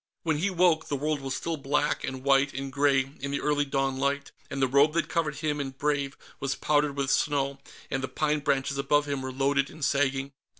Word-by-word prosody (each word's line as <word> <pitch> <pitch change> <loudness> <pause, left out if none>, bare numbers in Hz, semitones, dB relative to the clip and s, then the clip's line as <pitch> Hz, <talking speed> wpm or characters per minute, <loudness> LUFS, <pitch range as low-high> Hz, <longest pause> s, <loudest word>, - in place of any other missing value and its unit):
When 160 -3 0
he 200 +5 +1
woke, 175 -3 +3
the 145 - -1
world 150 +1 -1
was 135 -1 -3
still 165 -1 -3
black 145 +1 0
and 130 -1 -4
white 135 0 +3
and 135 0 -4
gray 135 -1 +2
in 140 - -4
the 140 - -1
early 145 -1 +1
dawn 135 -1 0
light, 140 +1 -1 0.2
and 135 - -4
the 135 - +3
robe 140 +4 +4
that 170 - +1
covered 155 -3 -1
him 150 0 -2
and 135 -2 -4
Brave 140 -2 -1 0.2
was 135 0 -1
powdered 145 -1 +1
with 135 -1 0
snow, 140 -2 +1 0.3
and 135 - 0
the 130 - -2
pine 150 +4 0
branches 140 -1 0
above 145 +1 +2
him 140 -2 -2
were 130 0 -4
loaded 140 +1 +1
and 155 -3 -4
sagging. 135 -1 +1
140 Hz, 220 wpm, -28 LUFS, 135-150 Hz, 0.3 s, robe